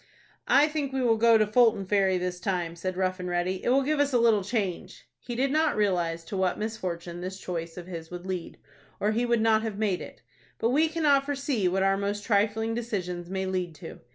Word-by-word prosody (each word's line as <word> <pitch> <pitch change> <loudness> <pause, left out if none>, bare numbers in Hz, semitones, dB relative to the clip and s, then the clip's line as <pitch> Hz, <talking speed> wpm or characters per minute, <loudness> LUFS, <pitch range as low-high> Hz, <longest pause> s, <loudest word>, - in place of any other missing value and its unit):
"I 290 +2 +5
think 300 -3 -3
we 265 -1 -1
will 230 -2 +4
go 230 0 +6
to 215 - +3
Fulton 215 -2 +3
Ferry 190 -1 +2
this 180 0 -3
time," 180 -3 -2
said 185 +2 -4
Rough 185 0 0
and 180 0 -4
Ready. 180 +1 -1
"It - - 0
will 270 +2 +4
give 300 +2 0
us 285 0 +2
a - - +5
little 225 -4 +3
change." 200 -4 -3
He 240 - -6
did 265 +3 +1
not 310 0 +2
realize 175 -5 0
to 195 - -5
what 190 -1 +1
misfortune 175 -6 -4
this 190 +1 -5
choice 170 -2 -5
of 175 - -7
his 165 -3 -8
would 175 0 -8
lead, 185 -3 -5 0.4
or 210 - +1
he 235 +3 0
would 235 -1 +2
not 220 -1 +4
have 220 -3 -4
made 205 -4 0
it; - - -11 0.3
but 230 - +1
we 305 +5 +3
cannot 300 -4 +2
foresee 275 -8 0
what 190 +2 +1
our 195 0 +3
most 200 +1 -2
trifling 220 +1 +1
decisions 180 -7 -4
may 190 0 -2
lead 180 -3 -2
to. - - -10
200 Hz, 225 wpm, -27 LUFS, 180-235 Hz, 0.4 s, go